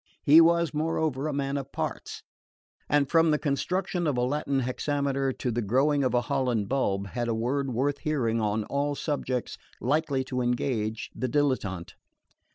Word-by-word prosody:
He 155 Hz, +3 st, +8 dB
was 170 Hz, 0 st, +3 dB
moreover 155 Hz, -2 st, -1 dB
a -, -, -1 dB
man 140 Hz, 0 st, -1 dB
of 140 Hz, 0 st, -6 dB
parts, -, -, -5 dB, 0.7 s
and 145 Hz, -1 st, +3 dB
from 165 Hz, +3 st, +4 dB
the 150 Hz, -, +3 dB
construction 175 Hz, +4 st, -1 dB
of 140 Hz, -4 st, 0 dB
a -, -, +1 dB
Latin 140 Hz, +1 st, 0 dB
hexameter 135 Hz, +1 st, -1 dB
to 125 Hz, -, -3 dB
the 120 Hz, +1 st, -1 dB
growing 135 Hz, +7 st, +2 dB
of 130 Hz, -1 st, +1 dB
a 120 Hz, -, +3 dB
Holland 125 Hz, -6 st, 0 dB
bulb, 100 Hz, -7 st, 0 dB
had 120 Hz, +2 st, -3 dB
a 115 Hz, -, 0 dB
word 130 Hz, +4 st, -1 dB
worth 135 Hz, +4 st, 0 dB
hearing 120 Hz, -7 st, 0 dB
on 105 Hz, 0 st, 0 dB
all 140 Hz, +5 st, -1 dB
subjects 130 Hz, -5 st, -3 dB, 0.2 s
likely 140 Hz, 0 st, 0 dB
to 130 Hz, -1 st, -3 dB
engage 120 Hz, -3 st, -1 dB
the 130 Hz, -, -3 dB
dilettante. 115 Hz, -, -1 dB
135 Hz, 165 wpm, -27 LUFS, 120-145 Hz, 0.7 s, He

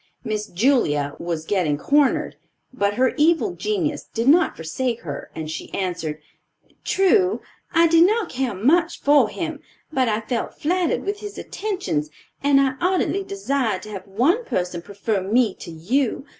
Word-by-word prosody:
Miss 215 Hz, -1 st, -3 dB
Julia 170 Hz, -, +1 dB
was 165 Hz, -2 st, -3 dB
getting 170 Hz, -7 st, +1 dB
cornered; 285 Hz, -, +2 dB, 0.4 s
but 205 Hz, -5 st, 0 dB
her 255 Hz, +2 st, +2 dB
evil 335 Hz, +5 st, +3 dB
genius 355 Hz, -9 st, -2 dB
did 230 Hz, +2 st, 0 dB
not 340 Hz, +6 st, +5 dB
forsake 230 Hz, +10 st, -3 dB
her, 145 Hz, -4 st, -6 dB
and 160 Hz, -1 st, -5 dB
she 155 Hz, -, -6 dB
answered, 170 Hz, -5 st, -3 dB, 0.6 s
"True, 385 Hz, 0 st, +3 dB, 0.3 s
I 335 Hz, 0 st, +5 dB
did 330 Hz, +1 st, +6 dB
not 440 Hz, +2 st, +1 dB
care 250 Hz, -4 st, -2 dB
much 320 Hz, -, +2 dB
for 290 Hz, 0 st, +4 dB
him; -, -, -4 dB, 0.3 s
but 260 Hz, -4 st, +2 dB
I 215 Hz, 0 st, 0 dB
felt 230 Hz, +1 st, -4 dB
flattered 350 Hz, +2 st, 0 dB
with 405 Hz, +1 st, -2 dB
his 415 Hz, -1 st, -8 dB
attentions 370 Hz, -, -3 dB, 0.3 s
and 280 Hz, -1 st, +4 dB
I 265 Hz, -1 st, +1 dB
ardently 375 Hz, +2 st, +1 dB
desired 275 Hz, -, -1 dB
to 215 Hz, -, -9 dB
have 200 Hz, -1 st, -7 dB
one 270 Hz, -, +2 dB
person 180 Hz, -, -2 dB
prefer 200 Hz, +2 st, -2 dB
me 215 Hz, +2 st, +2 dB
to -, -, -8 dB
you. 230 Hz, -, -1 dB
255 Hz, 155 wpm, -22 LUFS, -, 0.6 s, did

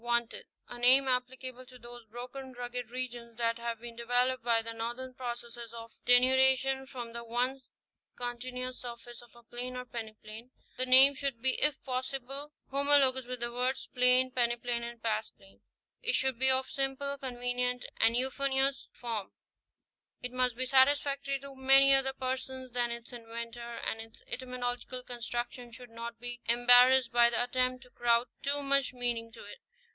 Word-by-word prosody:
WANTED: 235 Hz, -1 st, -1 dB, 0.2 s
a 240 Hz, -, -9 dB
name 260 Hz, +3 st, +6 dB
applicable 255 Hz, 0 st, -2 dB
to 255 Hz, -1 st, -13 dB
those 240 Hz, -1 st, -11 dB
broken, 250 Hz, +3 st, -8 dB
rugged 245 Hz, -1 st, -5 dB
regions 240 Hz, -2 st, -6 dB
that 230 Hz, 0 st, 0 dB
have 235 Hz, -1 st, -4 dB
been 235 Hz, 0 st, -9 dB
developed 245 Hz, +2 st, +1 dB
by 230 Hz, -1 st, +2 dB
the 230 Hz, 0 st, -5 dB
normal 240 Hz, +3 st, -5 dB
processes 240 Hz, -2 st, -6 dB
of 230 Hz, 0 st, -9 dB, 0.2 s
denudation 265 Hz, +1 st, +4 dB
from 240 Hz, -4 st, -7 dB
the 235 Hz, 0 st, -5 dB
once 245 Hz, +3 st, -1 dB, 0.5 s
continuous 250 Hz, +1 st, -5 dB
surface 240 Hz, -1 st, -9 dB
of 240 Hz, -1 st, -19 dB
a 235 Hz, -, -17 dB
plain 245 Hz, +2 st, -6 dB
or 250 Hz, -, -5 dB
peneplain, 220 Hz, 0 st, -8 dB, 0.3 s
The 255 Hz, +1 st, -1 dB
name 265 Hz, +2 st, +8 dB
should 275 Hz, -3 st, -3 dB
be 260 Hz, +2 st, +3 dB
if 295 Hz, -2 st, +2 dB
possible 270 Hz, +2 st, -4 dB, 0.2 s
homologous 275 Hz, -2 st, +3 dB
with 250 Hz, -1 st, -5 dB
the 240 Hz, 0 st, -3 dB
words, 250 Hz, +2 st, -1 dB
plain, 250 Hz, +1 st, +4 dB
peneplain 240 Hz, -1 st, 0 dB
and 235 Hz, -1 st, -8 dB
past 220 Hz, -1 st, -2 dB
plain; 195 Hz, 0 st, -19 dB, 0.4 s
it -, -, +1 dB
should 260 Hz, -3 st, +1 dB
be 265 Hz, 0 st, +5 dB
of 260 Hz, 0 st, +3 dB
simple, 275 Hz, +1 st, -2 dB
convenient 250 Hz, -1 st, -2 dB
and 230 Hz, +1 st, +4 dB
euphonious 270 Hz, +1 st, +1 dB
form; 225 Hz, -5 st, -5 dB, 0.9 s
it 250 Hz, -, -4 dB
must 250 Hz, -1 st, +1 dB
be 255 Hz, -, -1 dB
satisfactory 275 Hz, +1 st, +3 dB
to 275 Hz, -1 st, -10 dB
many 270 Hz, +1 st, +6 dB
other 270 Hz, 0 st, +2 dB
persons 260 Hz, 0 st, -4 dB
than 240 Hz, 0 st, 0 dB
its 235 Hz, +1 st, -7 dB
inventor; 235 Hz, 0 st, -7 dB
and 225 Hz, -, -2 dB
its 225 Hz, 0 st, -12 dB
etymological 250 Hz, 0 st, -4 dB
construction 240 Hz, 0 st, -5 dB
should 240 Hz, 0 st, -11 dB
not 230 Hz, 0 st, -7 dB
be 245 Hz, 0 st, -7 dB
embarrassed 245 Hz, +1 st, +6 dB
by 240 Hz, -1 st, +5 dB
the 235 Hz, -, 0 dB
attempt 255 Hz, +1 st, -1 dB
to 250 Hz, -, -19 dB
crowd 235 Hz, 0 st, +2 dB
too 285 Hz, +1 st, -1 dB
much 275 Hz, -1 st, +1 dB
meaning 240 Hz, -2 st, -2 dB
into 230 Hz, -, -13 dB
it. 205 Hz, -, -11 dB
245 Hz, 165 wpm, -31 LUFS, 235-260 Hz, 0.9 s, name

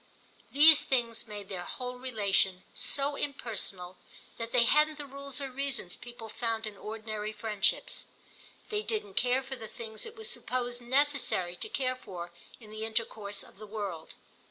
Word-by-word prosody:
These 300 Hz, +2 st, +9 dB
things 235 Hz, -3 st, +1 dB
made 205 Hz, -2 st, -6 dB
their 185 Hz, -2 st, -4 dB
whole 250 Hz, +5 st, -5 dB
relation 200 Hz, -6 st, +1 dB
so 280 Hz, +1 st, +3 dB
impersonal 200 Hz, -10 st, -3 dB, 0.4 s
that 230 Hz, 0 st, -4 dB
they 245 Hz, -2 st, +6 dB
hadn't 300 Hz, +5 st, +4 dB
the 295 Hz, -, -5 dB
rules 280 Hz, -1 st, -4 dB
or 275 Hz, -2 st, -4 dB
reasons 270 Hz, -8 st, -1 dB
people 240 Hz, -1 st, -9 dB
found 225 Hz, 0 st, -2 dB
in 215 Hz, -1 st, -6 dB
ordinary 215 Hz, 0 st, -4 dB
friendships. 215 Hz, -, +1 dB, 0.6 s
They 420 Hz, -1 st, 0 dB
didn't 425 Hz, -2 st, -2 dB
care 250 Hz, -1 st, +3 dB
for 265 Hz, 0 st, -5 dB
the 225 Hz, -3 st, -8 dB
things 220 Hz, -, -4 dB
it 450 Hz, -, -10 dB
was 440 Hz, 0 st, -3 dB
supposed 245 Hz, -, -1 dB
necessary 260 Hz, -8 st, +2 dB
to -, -, -3 dB
care 255 Hz, -1 st, 0 dB
for 175 Hz, -8 st, -7 dB, 0.3 s
in 215 Hz, -3 st, -12 dB
the 215 Hz, 0 st, -5 dB
intercourse 220 Hz, -2 st, 0 dB
of -, -, -16 dB
the 215 Hz, -, -8 dB
world. 200 Hz, -6 st, -5 dB
235 Hz, 160 wpm, -31 LUFS, 210-275 Hz, 0.6 s, These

